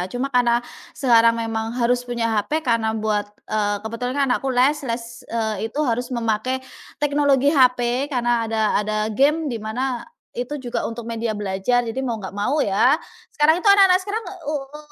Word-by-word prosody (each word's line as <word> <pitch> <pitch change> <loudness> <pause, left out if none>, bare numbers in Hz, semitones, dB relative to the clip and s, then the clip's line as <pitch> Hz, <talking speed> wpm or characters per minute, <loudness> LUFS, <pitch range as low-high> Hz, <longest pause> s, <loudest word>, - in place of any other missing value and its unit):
Cuma 250 +2 -2
karena 240 -1 +3 0.4
sekarang 230 -3 +4
memang 225 0 -3
harus 245 +1 +2
punya 235 -2 -2
HP 315 +6 -2
karena 230 -2 +2
buat 210 -1 0 0.2
eee 205 -1 0
kebetulan 230 +3 -3
kan 280 - +3
anakku 270 +2 -1
les 260 +4 +2
les, 235 -2 -3 0.3
eee, 220 -1 -2
itu 285 - -7
harus 245 +1 -1
memakai 235 +1 -1 0.4
teknologi 285 0 +2
HP 250 +1 +2
karena 240 -3 +1
ada 220 -1 0 0.2
ada 215 +1 -2
game 290 +8 +2
di 235 - -3
mana, 245 +3 -2 0.3
itu 250 +5 -4
juga 245 -2 -3
untuk 230 0 -5
media 230 -1 -2
belajar 210 +4 0
jadi 230 +4 -3
mau 230 -3 -2
nggak 190 -1 -8
mau 255 +9 0
ya. 245 +5 +3 0.3
Sekarang 305 +1 +4
itu 410 - +4
anak-anak 390 -2 +6
sekarang 420 +3 -4 0.3
u 305 - -2
u 295 +2 -11
240 Hz, 175 wpm, -22 LUFS, 225-270 Hz, 0.4 s, anak-anak